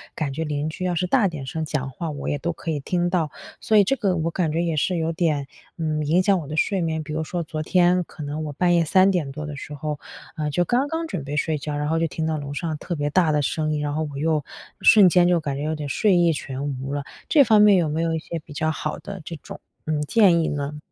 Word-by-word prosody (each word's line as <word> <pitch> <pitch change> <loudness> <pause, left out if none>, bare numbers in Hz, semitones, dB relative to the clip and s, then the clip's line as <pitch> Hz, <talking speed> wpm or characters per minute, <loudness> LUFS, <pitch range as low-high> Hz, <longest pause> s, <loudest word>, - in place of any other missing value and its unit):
感 145 -4 -2
觉 160 +4 -2
邻 150 0 -2
居 185 +4 -6
要 180 - 0
是 180 +2 0
大 215 +1 +3
点 155 -7 -6
声 160 +4 -3
讲 140 -3 -2
话 165 +5 -5
我 145 - -6
也 145 - 0
都 170 +4 -1
可 165 - -5
以 150 - -1
听 175 +4 0
到， 170 -4 0 0.3
所 215 - +2
以 205 - +7
这 270 - +1
个 200 -7 0
我 165 +1 -1
感 165 -4 0
觉 165 +2 0
也 165 -2 -1
是 175 +4 +1
有 165 0 0
点， 155 -5 0 0.3
嗯， 155 -2 -1
影 175 +5 +3
响 195 -2 +3
我 150 - -7
的 155 - -5
睡 190 +2 +1
眠。 160 -1 -1
比 150 - -6
如 160 +1 -1
说 170 +2 -3
昨 155 0 -5
天 180 +1 +3
可 150 - -10
能 150 +2 -4
我 150 - -5
半 175 +3 +2
夜 170 - +4
3 190 +4 +5
点 155 -7 -1
多 150 +2 -6
的 150 -1 -6
时 145 +1 -8
候， 150 0 -4 0.4
呃， 150 -1 -1
就 175 +5 +1
刚 255 - +1
刚 325 +2 -2
准 170 - -4
备 145 +2 -5
睡 155 0 0
觉， 145 0 -4
然 150 0 -1
后 165 +1 +1
就 165 - +1
听 160 0 -3
到 160 -1 0
楼 145 -1 -6
上 160 0 -3
特 175 - -4
别 145 -1 -1
大 170 -3 +3
的 150 -1 +2
声 155 +2 -1
音， 150 - -1
然 145 0 -2
后 155 +1 -1
我 140 - -7
又 155 -1 +1 0.4
瞬 205 -4 +8
间 175 0 +4
就 175 -1 +3
感 140 -3 -3
觉 145 - -3
有 155 +1 -1
点 150 -2 -5
睡 205 +5 +3
意 170 -1 +4
全 135 -2 -5 0.2
无 135 +1 -4
了， 145 -1 -2 0.3
这 290 -3 +7
方 215 -3 +5
面 205 -2 +7
有 170 -3 +2
没 155 +2 -1
有 165 0 0
一 - - -1
些 165 +1 -5
比 155 - -17
较 155 +1 0
好 150 -1 -4
的 195 -2 -8
这 165 - -6
种， - - -10 0.3
嗯， 155 -1 -1
建 180 -1 +4
议 - - 0
呢？ 145 +1 -3
160 Hz, 305 characters per minute, -23 LUFS, 150-175 Hz, 0.4 s, 瞬